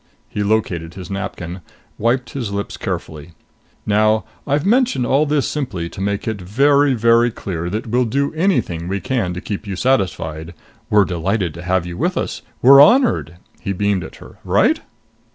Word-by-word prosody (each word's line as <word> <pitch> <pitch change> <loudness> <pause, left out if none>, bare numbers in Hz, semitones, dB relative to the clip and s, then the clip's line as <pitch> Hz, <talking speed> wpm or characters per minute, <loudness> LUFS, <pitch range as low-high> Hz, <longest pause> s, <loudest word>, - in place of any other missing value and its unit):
He 105 - -3
located 95 -6 -1
his 95 -1 -8
napkin, 95 -2 -5 0.4
wiped 120 +3 0
his 120 -7 -4
lips 100 0 -4
carefully. 80 +2 -5 0.5
"Now 110 +1 +2 0.2
I've 145 +3 +1
mentioned 235 - +2
all 140 +5 +2
this 145 -1 +1
simply 95 - -3
to 95 - -8
make 100 +2 -2
it 110 -3 -3
very, 140 +8 +3
very 115 +1 +4
clear 85 -6 -5
that 105 +4 -3
we'll 125 +2 +1
do 140 +6 -1
anything 155 - 0
we 100 +2 -2
can 110 -5 -1
to 90 - -5
keep 105 0 -5
you 100 - -3
satisfied. 85 -8 -1 0.3
We're 105 -3 +5
delighted 90 0 -1
to 85 - -9
have 90 0 0
you 85 0 -6
with - - -1
us. - - -3 0.2
We 130 - +7
are 140 0 +10
honored!" 145 - +4 0.2
He 100 - -3
beamed 100 -1 0
at - - -10
her. - - -14
"Right?" - - +3
105 Hz, 175 wpm, -19 LUFS, 90-130 Hz, 0.5 s, are